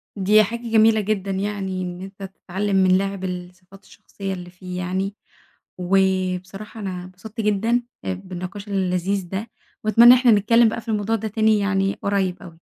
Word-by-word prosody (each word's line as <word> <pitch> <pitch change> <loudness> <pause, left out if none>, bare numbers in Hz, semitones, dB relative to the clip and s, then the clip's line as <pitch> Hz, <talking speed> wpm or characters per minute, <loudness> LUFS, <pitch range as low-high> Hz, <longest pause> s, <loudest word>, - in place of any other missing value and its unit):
دي 210 +2 +5
حاجة 230 +4 -4
جميلة 220 0 +5
جدًا 200 -1 -2
يعني 190 -1 -3
إن 180 0 -5
أنت 195 +1 -9
تتعلم 195 +1 -3
من 185 -1 +5
لاعب 195 -1 -3
الصفات 180 +1 -8
الشخصية 195 0 -7
اللي 180 -1 -8
فيه 180 0 -8
يعني، 190 +2 -2 0.6
وبصراحة 190 +2 -1
أنا 180 -3 -5
اتبسطت 200 +5 -8
جدًا، 225 +3 +1 0.2
آآ 95 - -1
بالنِقاش 185 - -7
اللذيذ 190 -1 -1
ده، 215 +4 -4 0.3
وأتمنى 235 +3 +8
إن 255 - +6
إحنا 250 -2 +5
نتكلم 220 +3 +5
بقى 230 - -4
في 230 - -23
الموضوع 215 0 0
ده 220 0 -3
تاني 215 0 +2
يعني 195 -1 +1
قريب 195 -2 0
أوي. 165 -2 -13
195 Hz, 165 wpm, -22 LUFS, 185-215 Hz, 0.6 s, وأتمنى